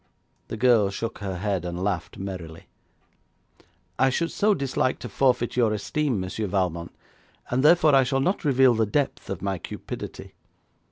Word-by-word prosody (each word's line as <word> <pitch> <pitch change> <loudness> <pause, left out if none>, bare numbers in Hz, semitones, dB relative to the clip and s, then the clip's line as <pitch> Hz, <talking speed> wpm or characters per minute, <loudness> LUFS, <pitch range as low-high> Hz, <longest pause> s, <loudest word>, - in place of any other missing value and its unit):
The 115 - -5
girl 115 -4 +4
shook 115 +4 -5
her 95 -3 -4
head 95 -1 -1
and 90 0 -4
laughed 95 -4 -2
merrily. 90 -4 -7 1.3
'I 135 - +5
should 165 +6 -1
so 210 0 +2
dislike 130 -3 -1
to - - -7
forfeit 125 +1 +1
your 120 -3 +3
esteem, 125 +3 -1
Monsieur 95 +3 -3
Valmont, 90 -3 -1 0.6
and 125 +1 +2
therefore 155 0 +5
I 135 - +7
shall 135 +1 0
not 180 +9 0
reveal 135 -4 +4
the 110 -1 +1
depth 140 +7 -1
of 95 -2 -5
my 95 -2 -2
cupidity. - - -8
115 Hz, 160 wpm, -25 LUFS, 95-135 Hz, 1.3 s, I